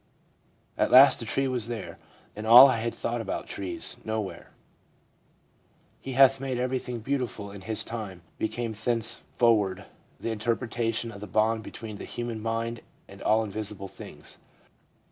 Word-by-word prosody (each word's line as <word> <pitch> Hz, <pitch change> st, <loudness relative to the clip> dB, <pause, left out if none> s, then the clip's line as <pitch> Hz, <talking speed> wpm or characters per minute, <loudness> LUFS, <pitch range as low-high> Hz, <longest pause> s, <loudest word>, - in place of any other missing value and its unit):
At -, -, +3 dB
last 130 Hz, +1 st, +8 dB
the 115 Hz, -, -4 dB
tree 135 Hz, +4 st, 0 dB
was 125 Hz, -4 st, -2 dB
there, 115 Hz, -2 st, -6 dB, 0.4 s
and 110 Hz, +1 st, -6 dB
all 125 Hz, +4 st, +11 dB
I 130 Hz, -, +1 dB
had 115 Hz, +1 st, -2 dB
thought 120 Hz, 0 st, -2 dB
about -, -, -4 dB
trees, 95 Hz, -3 st, -4 dB
nowhere. 110 Hz, -3 st, -4 dB, 0.8 s
" -, -, -38 dB
He 135 Hz, -, -6 dB
hath 135 Hz, +1 st, +6 dB
made 130 Hz, -2 st, -2 dB
everything 125 Hz, -1 st, -2 dB
beautiful 120 Hz, -5 st, -3 dB
in 100 Hz, -1 st, -10 dB
His 110 Hz, +2 st, 0 dB
time" 105 Hz, -6 st, -7 dB, 0.2 s
became 115 Hz, +1 st, -2 dB
thenceforward 110 Hz, -3 st, +1 dB, 0.3 s
the 115 Hz, -, -3 dB
interpretation 115 Hz, +1 st, -1 dB
of 100 Hz, -2 st, -11 dB
the 105 Hz, -, -6 dB
bond 110 Hz, +3 st, +1 dB
between 110 Hz, -1 st, -8 dB
the -, -, -8 dB
human 120 Hz, -2 st, -5 dB
mind 115 Hz, +1 st, -3 dB, 0.3 s
and 100 Hz, 0 st, -13 dB
all 110 Hz, +1 st, +2 dB
visible 105 Hz, -1 st, -5 dB
things.' -, -, -11 dB
115 Hz, 150 wpm, -27 LUFS, 105-120 Hz, 0.8 s, all